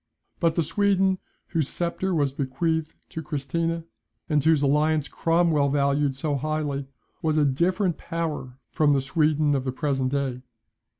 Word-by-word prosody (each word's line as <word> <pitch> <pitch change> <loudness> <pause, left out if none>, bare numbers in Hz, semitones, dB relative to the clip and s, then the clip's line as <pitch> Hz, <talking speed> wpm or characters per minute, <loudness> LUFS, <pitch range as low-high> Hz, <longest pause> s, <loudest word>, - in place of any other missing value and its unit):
But 165 -2 +2
the 170 - +2
Sweden, 195 +2 +2 0.3
whose 160 -5 0
sceptre 175 +2 -2
was 140 -4 +1
bequeathed 155 +4 -1
to 160 - -5
Christina, 165 +2 -2 0.4
and 150 -3 +2
whose 160 -2 +4
alliance 150 +1 +2
Cromwell 165 -4 +2
valued 140 0 +1
so 145 +1 -1
highly, 145 -1 -2 0.3
was 155 -1 +1
a 150 - +4
different 175 +6 +1
power 155 -6 -4
from 150 -2 +3
the 135 - +2
Sweden 150 +1 +2
of 135 -2 0
the 130 - -2
present 135 -1 -1
day. 135 -3 -1
150 Hz, 145 wpm, -25 LUFS, 140-165 Hz, 0.4 s, whose